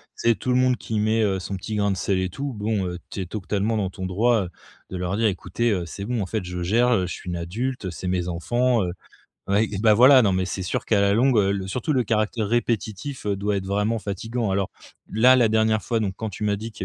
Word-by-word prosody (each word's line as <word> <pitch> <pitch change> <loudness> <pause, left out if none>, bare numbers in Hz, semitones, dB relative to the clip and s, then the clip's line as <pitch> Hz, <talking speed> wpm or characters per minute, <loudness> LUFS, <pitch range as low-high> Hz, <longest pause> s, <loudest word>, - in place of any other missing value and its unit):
c'est 115 -1 +2
tout 125 - -5
le 125 - +3
monde 130 0 +3
qui 110 -2 -3
met, 110 +1 +2
heu, 95 -2 +1
son 95 +1 -5
petit 105 +3 -5
grain 100 -1 +1
de - - 0
sel 95 0 0
et 95 - 0
tout. 140 +9 -4
Bon, 105 -2 -1
heu, 90 0 -4
tu 100 - -5
es - - -3
totalement 105 +3 -2
dans 100 -3 -1
ton 95 0 -6
droit, 110 +4 +2
heu, - - -8 0.4
de 95 - -5
leur 90 +1 -2
dire: 110 +1 +2
«Écoutez, 100 +4 -1
heu, 90 -4 -1
c'est 100 +4 -7
bon, 115 +1 -2
en - - -1
fait, 105 +1 -3
je 90 0 -5
gère, 115 +7 +3
heu, 95 -4 +2
je - - -4
suis 90 - -8
une 85 - -2
adulte, 110 +8 -3
heu, 90 - -3
c'est 90 - -6
mes 90 -1 -1
enfants, 120 +6 +1
heu». 90 - -2 0.6
Oui, 105 +2 +2
bah, 110 -2 +6
voilà, 130 +4 +7
non 100 -2 +2
mais 95 0 +1
c'est 95 0 -4
sûr 90 - -2
qu'à 105 -3 +2
la 100 0 +3
longue, 125 +2 +3
heu, 100 -1 +3
le 95 -1 -3
surtout 130 - -2
le 125 - +2
caractère 110 0 0
répétitif, 120 +2 -2
heu, 100 - +1
doit 100 +1 -1
être 95 - -3
vraiment 105 +3 0
fatiguant. 110 +2 -3
Alors 95 0 0 0.4
là, 125 +4 +5
la 120 -3 +5
dernière 110 -1 +2
fois 115 -2 -1
donc 95 -3 -2
quand 110 -1 -3
tu 100 +2 -7
m'as 100 -1 +1
dit 110 +2 -6
qu'il - - -6
105 Hz, 270 wpm, -24 LUFS, 95-115 Hz, 0.6 s, voilà